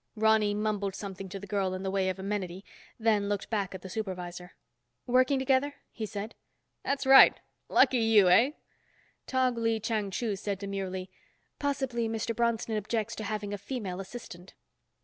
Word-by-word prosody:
Ronny 215 -1 +3
mumbled 205 -2 -1
something 195 -1 -7
to 195 +1 -6
the 200 - -8
girl 195 -2 -1
in 185 - -5
the 190 - -2
way 190 -1 +1
of 185 - -3
amenity, 190 -1 -4 0.3
then 215 -3 +2
looked 205 +1 -3
back 200 -3 -1
at 185 - -9
the - - -6
supervisor. 180 -3 -5 0.5
"Working 255 +2 +3
together?" 265 +2 +1 0.2
he 220 -2 -5
said. 205 +3 -6 0.5
"That's 280 0 -1
right. 270 0 +8 0.3
Lucky 255 - +4
you, 220 -4 +5
eh?" 230 +11 +5 0.7
Tog 255 -2 +1
Lee 225 -1 +1
Chang 215 -2 -1
Chu 210 +1 -2
said 200 0 -3
demurely, 190 -2 -4 0.5
"Possibly 265 -5 -1
Mr. 225 +1 -2
Bronston 230 -1 0
objects 220 +2 -2
to 220 - -4
having 210 -1 -3
a 205 - -4
female 205 -4 -5
assistant." 190 -3 -9
210 Hz, 165 wpm, -29 LUFS, 195-230 Hz, 0.7 s, right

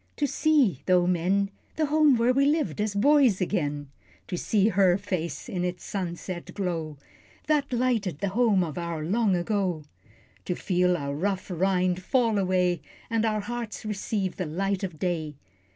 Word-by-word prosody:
To 295 - 0
see, 280 - +2
though 180 -1 +4
men, 185 +3 +1 0.2
The 315 - +1
Home 300 -3 +4
where 235 +2 +3
we 275 +2 +3
lived 300 -7 0
as 210 -1 -1
boys, 265 -2 +4
again; 145 -7 -2 0.4
To - - -2
see 205 +3 +2
her 190 -3 +4
face 180 -4 -4
in 180 -1 -3
its 180 0 -3
sunset 180 -2 -5
glow, 165 -6 -3 0.5
That 295 -3 +1
lighted 235 - 0
the 200 +5 -2
Home 205 -3 +3
of 165 0 -4
our 170 -2 -3
Long 205 +2 +2
ago, 180 -3 -1 0.6
To 180 - -1
feel 180 -1 +1
our 140 -2 -3
rough 190 +5 -2
rind 185 0 +1
fall 230 -1 +1
away, 180 -3 +1 0.3
And 225 0 +1
our 215 -1 0
hearts 235 0 -5
receive 200 -2 -2
the 185 - -2
light 195 +5 -2
of 180 -5 -4
day. 160 -4 -2
190 Hz, 165 wpm, -26 LUFS, 175-220 Hz, 0.6 s, though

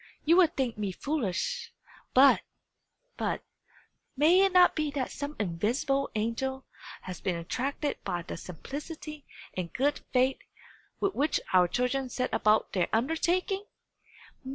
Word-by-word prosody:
"You 330 +3 +6
will 370 -2 +7
think 265 -8 -3
me 205 -2 -1
foolish 280 - -2 0.4
but 270 +2 +7 0.8
but - - -2 0.7
may 330 +7 +6
it 390 - +3
not 360 -1 +6
be 305 -1 0
that 280 -3 -3
some 285 +1 -5
invisible 240 - 0
angel 265 +5 -2 0.4
has 185 -2 -7
been 185 - 0
attracted 270 - -3
by 175 -1 -2
the - - -6
simplicity 295 - -8 0.3
and 180 -2 -3
good 285 +3 +1
faith 260 +1 +2 0.6
with 395 -1 +1
which 295 +2 +1
our 180 -1 +6
children 250 +5 -1
set 255 +1 -2
about 215 +1 +3
their 180 -3 +1
undertaking? 345 - +1
270 Hz, 130 wpm, -29 LUFS, 215-305 Hz, 0.8 s, will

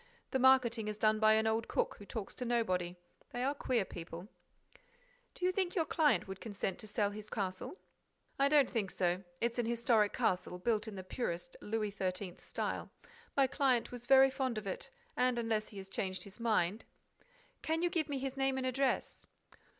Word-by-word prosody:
The 265 - +1
marketing 250 -4 +4
is 210 -1 -3
done 215 0 +3
by 215 0 +6
an 220 0 +3
old 220 +1 +1
cook, - - 0
who 205 - -11
talks 215 -4 -5
to - - -5
nobody. 185 -8 0 0.3
They 245 - -3
are 275 +2 +2
queer 250 -7 0
people—" 170 +1 -8 1.1
"Do 360 - -2
you 365 - +4
think 370 -1 -1
your 330 -4 +2
client 305 -9 +2
would 190 -1 -7
consent 200 -4 -3
to 215 - -8
sell 205 -1 0
his 210 +1 -8
castle?" 195 - -3 0.6
"I 275 +1 +5
don't 290 -3 +6
think 210 -5 -1
so. 180 0 0 0.2
It's 235 +1 0
an 235 - +1
historic 230 -3 +3
castle, 180 0 0
built 220 +3 0
in 215 - -6
the 190 - -6
purest 185 +2 -4
Louis 215 -1 -1
XIII. 185 -2 -3
style. - - -3 0.5
My 275 - +6
client 260 -3 +1
was 245 -1 -8
very 270 0 +7
fond 260 -3 -1
of 215 - -4
it; 190 - -4 0.3
and, 250 -1 +2
unless 225 -2 0
he 205 - -11
has 190 0 -7
changed 190 -1 -3
his 200 +3 -11
mind—" 215 -3 +1 0.8
"Can 325 +2 0
you 350 - +2
give 320 -3 0
me 285 - -1
his 270 0 -3
name 270 -1 +1
and 260 - -1
address?" 260 +1 0
225 Hz, 195 wpm, -34 LUFS, 200-260 Hz, 1.1 s, very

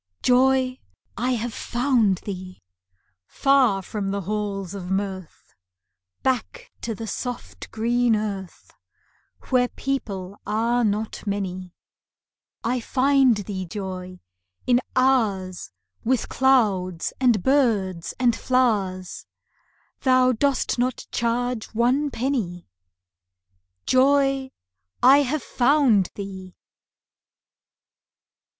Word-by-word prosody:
Joy, 255 0 +3 0.4
I 250 +3 0
have 235 -1 -3
found 240 -7 +1
thee! 185 -2 -7 0.7
Far 260 -8 +3
from 200 0 -4
the 200 +1 -2
halls 200 -1 -3
of 185 -3 -6
Mirth, 190 -2 -4 0.7
Back 255 -3 -2
to 225 -2 -3
the 225 - -6
soft 245 +3 -6
green 235 +1 +1
earth, 200 -4 -5 0.8
Where 250 -1 +3
people 205 -9 -4
are 230 +3 +1
not 215 0 -2
many; 185 -3 -4 0.9
I 245 +2 0
find 265 0 +3
thee, 195 -2 -5
Joy, 185 -1 -6 0.4
in 245 0 +3
hours 205 - +1 0.3
With 255 +1 0
clouds, 200 -10 +2
and 240 -7 +3
birds, 210 - +1
and 240 -2 +3
flowers 205 -9 0 0.7
Thou 255 -1 +4
dost 260 0 0
not 250 0 -1
charge 235 0 -1
one 255 +6 +2
penny. 230 - -3 1.2
Joy, 270 0 +3 0.5
I 270 +3 +8
have 285 0 -1
found 245 -7 +3
thee! 190 -2 -8
230 Hz, 95 wpm, -24 LUFS, 195-255 Hz, 1.2 s, I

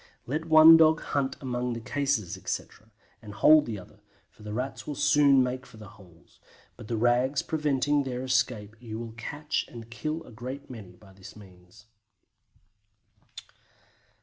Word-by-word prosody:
Let 155 +6 -3
one 160 0 +8
dog 160 0 +4
hunt 140 -2 -2
among 125 -2 -3
the 115 - -5
cases, 125 -4 -2
etc., 110 - -6 0.3
and 105 -3 -11
hold 155 +3 +5
the 110 -3 -4
other, 95 +2 -14 0.3
for 120 - -21
the 105 0 -8
Rats 125 +5 -5
will 150 - -4
soon 145 -2 +4
make 125 +1 -3
for 125 -4 -16
the 105 -2 -12
holes, 90 -6 -20 0.4
but - - -12
the 115 - -2
rags 125 +4 +1
preventing 145 -2 0
their 130 -2 -4
escape 125 -5 -1
you 110 -2 -7
will 115 0 -7
catch 145 +6 -3
and 115 -1 -12
kill 155 +7 -4
a 125 - -15
great 130 +5 -8
many 105 -7 -10
by 95 0 -19
this 95 -1 -13
means. 95 -2 -17
125 Hz, 160 wpm, -27 LUFS, 110-145 Hz, 0.4 s, one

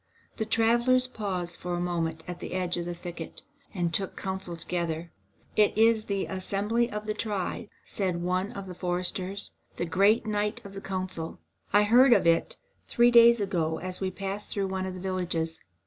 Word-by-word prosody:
The 220 - -2
travellers 235 +3 +3
paused 185 -8 -3
for 175 0 -3
a - - -2
moment 165 -2 -2
at 175 -1 -6
the - - -6
edge 180 -1 0
of 175 - -3
the 175 - -3
thicket, 170 -1 -8 0.3
and 175 -4 -1
took 195 +2 0
counsel 190 -3 -4
together. 170 -1 -3 0.4
"It 210 -1 +3
is 225 -1 +4
the 200 -1 -1
assembly 205 +5 -1
of 210 -1 -5
the 215 - -1
tribe," 205 -2 -3 0.2
said 185 -4 -2
one 185 +3 0
of 195 -5 -6
the 185 - -7
foresters, 180 +2 -2 0.3
"the - - -1
great 200 +7 +3
night 210 -1 -1
of 200 - -9
the 195 - -7
council. 185 -4 -4 0.3
I 205 +1 +6
heard 245 +4 +7
of - - +3
it 165 0 +2 0.3
three 240 0 +4
days 235 0 +8
ago, 170 -6 0
as 185 +1 -5
we 190 - 0
passed 195 +2 -5
through 195 -2 -1
one 190 0 -2
of 185 - -5
the - - -7
villages. 175 -3 -2
190 Hz, 185 wpm, -28 LUFS, 175-210 Hz, 0.4 s, days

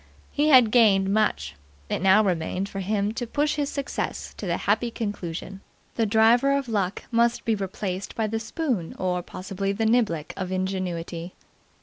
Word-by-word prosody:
He 295 +1 +1
had 250 -6 +7
gained 200 -5 +4
much; 140 - 0 0.3
it - - -2
now 195 +3 +5
remained 180 0 -1
for 195 - -6
him 200 +1 0
to 240 0 -4
push 295 +5 0
his 285 -1 -1
success 280 -2 -4
to 200 - -5
the 170 - 0
happy 220 +4 +2
conclusion. 195 -4 -5 0.3
The 225 -2 0
driver 235 +6 +4
of 275 -2 -3
Luck 200 -4 -1
must 235 0 +2
be 225 - +2
replaced 195 -1 -4
by 220 - 0
the 225 +1 -2
spoon 225 - -3
or, 180 -1 -1
possibly, 195 +2 -4
the 220 +2 -1
niblick 220 -10 +1
of 185 -1 -4
Ingenuity. 185 -2 -3
205 Hz, 165 wpm, -25 LUFS, 185-230 Hz, 0.3 s, had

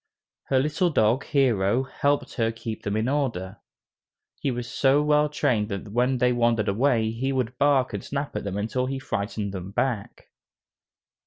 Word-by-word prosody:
Her 135 - +1
little 155 +6 +1
dog, 120 -2 +2
Hero, 120 -4 +2
helped 140 +2 -1
her 115 -2 0
keep 115 -1 -6
them 100 +1 -2
in 110 +2 0
order. 115 -9 -2 0.8
He 140 - -1
was 120 -1 -3
so 140 +2 +3
well 150 0 +3
trained 115 -7 0
that 100 0 -5
when 125 +4 +1
they 125 0 +3
wandered 115 -3 +2
away, 110 +1 +2
he 130 +4 -2
would 125 -2 -1
bark 140 -3 +3
and - - -4
snap 140 -2 -4
at 105 - -2
them 100 -1 -3
until 120 +5 -1
he 135 +1 -2
frightened 105 -5 -3
them 95 -1 -6
back. 110 0 -3
120 Hz, 170 wpm, -25 LUFS, 105-135 Hz, 0.8 s, so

